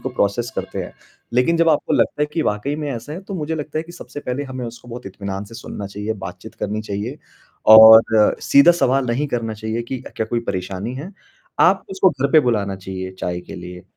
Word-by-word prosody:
को 130 - -3
प्रोसेस 120 0 -1
करते - - -4
हैं। - - -9 0.4
लेकिन 125 +7 +3
जब 165 0 +3
आपको 150 -2 +1
लगता 150 - +1
है - - +2
कि 165 - 0
वाक़ई 105 +4 -1
में 150 -2 -4
ऐसा 120 +5 -7
है 175 - -6
तो 195 +1 -7
मुझे 160 -2 -3
लगता 155 0 -4
है - - -1
कि 170 +1 -13
सबसे 170 -4 -9
पहले 125 +1 -3
हमें 130 -2 -6
उसको 120 +1 -11
बहुत 120 -1 -8
इत्मीनान 100 0 -5
से 110 +3 -14
सुनना 110 -3 -7
चाहिए, 105 +2 -4
बात-चीत 105 - -9
करनी 105 +1 -3
चाहिए 110 +7 -5 0.6
और 110 -1 +8
सीधा 140 +5 +6
सवाल 135 -5 +1
नहीं 125 +5 0
करना 115 -3 -2
चाहिए 110 +2 -3
कि 125 +2 -6
अ, - - -8
क्या 110 - -1
कोई 120 +1 -1
परेशानी 95 +5 -4
है? 155 +9 -7 0.5
आप 195 - +4
उसको 190 0 +3
घर 140 -2 -2
पे 155 - +8
बुलाना 105 -7 0
चाहिए 95 0 -6
चाय 90 0 -3
के - - -11
लिए, 90 0 -9
120 Hz, 225 wpm, -20 LUFS, 105-145 Hz, 0.6 s, और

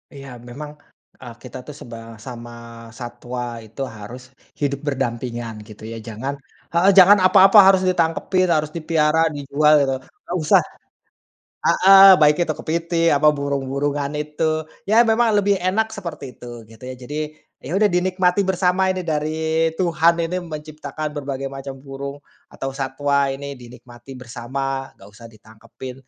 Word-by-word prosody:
Iya, 140 -1 -10 0.2
memang, 145 +4 -8 0.5
eee, 120 -2 -9
kita 125 - -9
itu 150 +4 -10
sebang 115 -1 -10 0.2
sama 120 -2 -8 0.5
satwa 120 -1 -6
itu 110 +5 -10 0.2
harus 115 +5 -9 0.4
hidup 140 -1 -2
berdampingan, 120 -3 -3 0.2
gitu, 110 0 -12
ya. 115 - -6
Jangan 115 +5 -4 0.4
heeh, 175 +4 +4
jangan 195 +2 +9
apa-apa 195 +3 +6
harus 190 -1 +5
ditangkepin, 180 +2 +1
harus 155 -2 +1
dipiara, 160 -1 +1 0.2
dijual, 145 +2 +2
gitu, 135 - -1
nggak 175 +6 -7
usah. 150 - +5 1.0
Heeh, 195 +1 +7
baik 150 0 +5
itu 170 - -2
kepitiing, 165 0 0
apa 150 +2 +4
burung-burungan 140 +1 -2
itu. 155 +1 -2 0.2
Ya, 220 +3 +5
memang 235 +1 +3
lebih 200 0 +2
enak 215 +5 +1
seperti 175 -7 -7
itu, - - -13 0.2
gitu, 115 +1 -17
ya. - - -6
Jadi, 145 +4 -8 0.5
ya, - - -7
udah 210 - +4
dinikmati 185 +1 +1
bersama 185 0 +1
ini 185 0 -2
dari 160 +1 0
Tuhan 170 -1 +3
ini 180 +2 -4
menciptakan 155 -2 -6
berbagai 135 0 -4
macam 135 0 -8
burung, 140 +1 -8 0.3
atau 135 0 -6
satwa 140 +1 0
ini 140 +1 -7
dinikmatin 125 0 -13
bersama. 135 +2 -5
Nggak 95 - -15
usah 115 +2 -12
ditangkepin. 110 +3 -12
145 Hz, 145 wpm, -21 LUFS, 130-170 Hz, 1.0 s, jangan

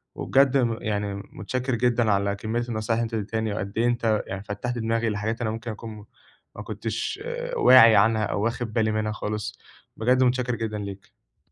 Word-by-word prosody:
وبجد 135 +11 +3
م 115 -4 +1
يعني، 105 -2 -2
متشكِّر 125 +6 -4
جدًا 120 -2 +2
على 100 0 +1
كمية 110 +3 -2
النصايح 110 0 -1
اللي - - +1
أنت 115 0 -5
ادِّيتهاني، 110 0 -2
وقد 100 -1 -4
إيه 115 - +2
أنت 115 -3 +1
يعني 95 +1 -5
فتَّحت 105 +4 -4
دماغي 115 0 0
لحاجات 110 +3 -2
أنا 110 -2 0
ممكن 115 +1 -5
أكون 110 +2 -8
م 105 - -12 0.5
ما - - -7
كنتش - - -4 0.4
واعي 115 - +8
عنها 110 +1 +4
أو 100 - -2
واخِد 115 -1 -2
بالي 110 -2 +2
منها 110 0 -1
خالص. 105 0 -4 0.4
بجد، 125 +3 +3
متشكِّر 125 -1 +1
جدًا 110 -2 -3
ليك. 100 -6 -11
110 Hz, 180 wpm, -25 LUFS, 105-120 Hz, 0.5 s, واعي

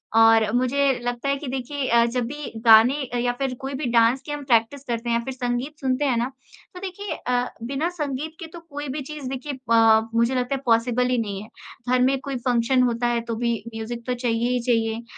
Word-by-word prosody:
और 225 -1 +6
मुझे 270 +2 +2
लगता 245 +3 -2
है 280 - +2
कि 290 - -7
देखिए 265 +1 -3
अ, 235 0 +5
जब 240 0 -1
भी 290 +3 -6
गाने 225 +4 +7 0.2
या 245 0 +1
फिर 265 -2 -1
कोई 270 +1 -4
भी 270 +1 -3
डांस 235 +3 +4
की - - -6
हम 295 -1 -4
प्रैक्टिस 245 +2 +2
करते 235 -2 -3
हैं 235 - +2
या 235 - -3
फिर 265 - -4
संगीत 250 +4 -3
सुनते 265 +1 0
हैं 250 -4 +1
ना, 240 +3 -1 0.4
तो - - -7
देखिए 390 +2 -5
अ, 245 0 -1
बिना 280 +7 -1
संगीत 305 -2 -4
के 330 - -7
तो 340 - -8
कोई 290 -3 -7
भी 285 +3 -3
चीज़ 285 -1 -7
देखिए 270 +2 -4
पा 225 -1 +6
मुझे 235 +3 +2
लगता 250 +2 0
है 270 - -5
पॉसिबल 240 +1 +2
ही 250 - +1
नहीं 200 -3 -3
है। 215 - -14 0.5
घर - - +1
में 270 +2 +3
कोई 275 -1 -4
फंक्शन 250 +1 +3
होता 240 0 +1
है 240 -1 0
तो 230 - -1
भी 235 0 0 0.2
म्यूज़िक 235 +1 -5
तो 250 - +1
चाहिए 240 -1 0
ही 250 - +1
चाहिए 225 0 0
250 Hz, 230 wpm, -23 LUFS, 235-275 Hz, 0.5 s, गाने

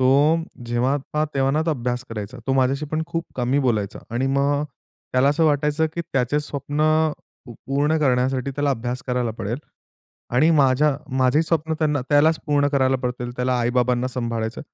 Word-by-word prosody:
तो 130 0 +4 0.6
जेव्हा 120 +4 +1 0.2
पहावा 150 0 +1
तेव्हा 135 0 +2
ना, 155 +2 +1
तो - - +2
अभ्यास 125 -3 -2
करायचा. 110 +2 -6
तो 135 - +1
माझ्याशी 135 +3 +1
पण 155 +2 -2
खूप 165 0 -3
कमी 125 +2 +1
बोलायचा 110 -5 -1 0.2
आणि 130 +3 0
मग 140 +2 +1 0.5
त्याला 130 +2 +4
असं 150 +3 +2
वाटायचं 150 +1 +2
की 170 - -2
त्याचे 135 +3 +1
स्वप्न 145 0 -4 0.7
पूर्ण 140 +6 -1
करण्यासाठी, 130 -1 +1
त्याला 145 +1 0
अभ्यास 125 0 -3
करायला 125 -2 0
पडेल 110 +6 -3 0.8
आणि 155 +7 +5
माझ्या 145 -1 +3 0.2
माझे 130 +4 +3
स्वप्न 160 -1 0
त्यांना 150 -3 +1
त्यालाच 155 +2 +4
पूर्ण 145 -1 +2
करायला 135 -2 +2
पडतील, 125 -1 -3
त्याला 125 +1 0
आई-बाबांना 125 +1 +1
सांभाळायचं. 115 -2 -3
135 Hz, 165 wpm, -22 LUFS, 125-145 Hz, 0.8 s, आणि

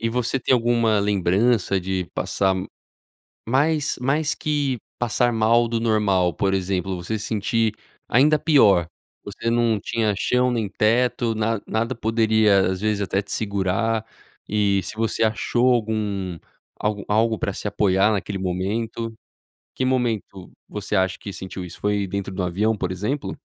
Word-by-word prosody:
E 115 - 0
você 125 +3 -1
tem 130 - +1
alguma 115 -3 +3
lembrança 100 +1 +2
de 95 -1 -2
passar 95 -1 0 0.9
mais 150 +4 +1
mais 145 +4 +1
que 145 -4 -1 0.2
passar 120 0 +1
mal 115 +1 +3
do 115 0 -1
normal, 100 -6 +2
por 95 -1 0
exemplo, 95 0 -1
você 90 +5 -3
sentir 110 +1 0 0.3
ainda 150 +6 +4
pior. 100 - +4 0.4
Você 110 +3 -4
não 115 -3 +2
tinha 110 0 0
chão 125 +3 +2
nem 115 -4 -1
teto, 115 +3 +1
na 110 -1 -1
nada 115 +3 -1
poderia, 110 -4 +3
às 95 +1 -4
vezes, 105 -1 0
até 100 +1 0
te 100 - -12
segurar 100 +2 0 0.5
e 100 -2 +2
se - - -7
você 115 0 0
achou 120 +3 +2
algum 105 -6 -2 0.4
algo 105 -1 -2
algo 110 +1 +2
pra 100 - -2
se 105 - -5
apoiar 100 0 +2
naquele 100 -1 -2
momento? 110 +5 -3 0.6
Que 130 - -1
momento 115 -7 -1 0.2
você - - -4
acha 95 0 +1
que 100 - -7
sentiu 95 -1 -7
isso? 85 - -11
Foi 105 -1 0
dentro 95 0 -4
de 95 - -7
um - - 0
avião, 105 +5 0
por 90 -1 -2
exemplo? 105 +10 -3
110 Hz, 155 wpm, -23 LUFS, 95-115 Hz, 0.9 s, ainda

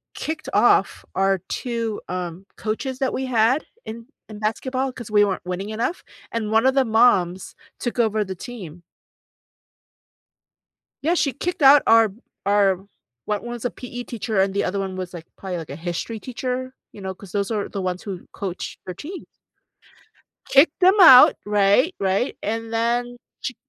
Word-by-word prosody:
kicked 315 0 -5
off - - +3
our 195 0 +2
two, 230 -3 -3
um, 180 +1 -5
coaches 255 +5 -3
that 265 - 0
we 265 - -2
had 255 +4 +2 0.2
in 230 +1 -8 0.2
in 210 -1 -9
basketball 255 +5 -2
'cause 235 -4 -9
we 205 -1 +5
weren't 190 -3 -3
winning 185 +3 -4
enough, 230 +11 -3 0.3
and 220 -2 -2
one 225 +2 +3
of 265 0 +3
the 270 -2 +3
moms 195 -6 +2 0.2
took 240 0 -3
over 220 -2 +2
the 190 -1 -6
team. 175 -7 -9 2.2
Yeah, 325 +4 +2
she 285 -6 +1
kicked 350 +2 -4
out 275 +1 +8
our 225 -1 +6
b 205 +5 -16 0.3
our 200 -1 +4
o 195 - -20 0.4
one's 235 +3 -4
a 245 - 0
PE 245 -1 -7
teacher 220 -4 -2
and 195 0 +2
the 200 - 0
other 195 +2 -2
one 190 -1 -3
was, 185 -1 -6
like, 165 -2 -8
probably, 185 -3 -5
like, 160 - -8
a 140 - -6
history 175 +7 -4
teacher, 255 +1 -4 0.2
you - - -12
know, 190 -1 -5
'cause 190 -1 -14
those 200 0 -1
are 210 -3 -2
the 200 - -5
ones 185 -1 -3
who 190 -4 -7
coached 190 -2 -6
her 180 - -5
teams. 340 - -8 1.2
Kicked 285 +4 +4
them 375 +2 +6
out, 260 -8 +10
right, 210 - +3
right, 195 +6 0
and 225 +2 -3
then 240 +1 0 0.2
she 255 - -4
220 Hz, 170 wpm, -22 LUFS, 195-250 Hz, 2.2 s, out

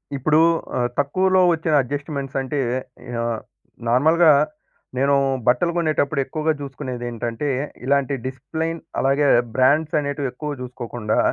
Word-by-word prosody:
ఇప్పుడు 150 +3 +2 0.4
ఆహ్, 120 -1 +1
తక్కువలో 185 +7 +2
వచ్చిన 160 -1 -1
అడ్జస్ట్‌మెంట్స్ 140 0 -4
అంటే 135 +2 -3 0.6
ఆహ్, 115 -1 -1 0.5
నార్మల్‌గా 160 +8 +4 0.7
నేనూ 140 +2 +3 0.3
బట్టలు 170 +8 +3
కొనేటప్పుడు 155 -3 +1
ఎక్కువగా 155 +3 -1
చూసుకునేది 130 -3 -6
ఏంటంటే 120 +4 -3 0.4
ఇలాంటి 140 0 +1
డిసిప్లేన్‌ 160 +6 -3 0.2
అలాగే 140 +2 +2 0.3
బ్రాండ్స్ 145 +5 +3
అనేటివి 140 -2 -2
ఎక్కువగా 145 +3 -5
చూసుకోకుండా 120 -3 -3
140 Hz, 110 wpm, -22 LUFS, 130-155 Hz, 0.7 s, నార్మల్‌గా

